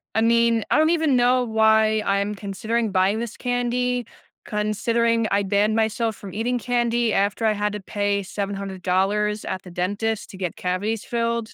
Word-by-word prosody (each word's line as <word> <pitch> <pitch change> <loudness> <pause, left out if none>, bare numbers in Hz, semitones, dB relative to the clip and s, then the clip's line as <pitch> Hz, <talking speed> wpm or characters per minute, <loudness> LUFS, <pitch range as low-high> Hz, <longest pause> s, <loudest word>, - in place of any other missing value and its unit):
I 220 - +3
mean, 230 -1 +3
I - - +4
don't 315 +1 +4
even 320 -5 +2
know 250 +1 +3
why 220 -1 +3
I'm 200 +1 0
considering 215 +2 -2
buying 190 +3 +2
this 235 -2 -5
candy 245 0 -1 0.4
considering 230 +2 0
I 200 0 +3
banned 205 +2 +1
myself 225 0 0
from 195 -1 -10
eating 240 +4 -1
candy 240 -1 +1
after 200 +3 +1
I 215 - +3
had 210 0 -1
to 210 - -4
pay 205 +1 -1
$700 195 +1 -1
at 185 - -4
the 180 - -11
dentist 205 +5 -2
to 190 - -10
get 180 -4 -3
cavities 200 +5 -2
filled. 230 -1 -2
220 Hz, 165 wpm, -23 LUFS, 200-235 Hz, 0.4 s, I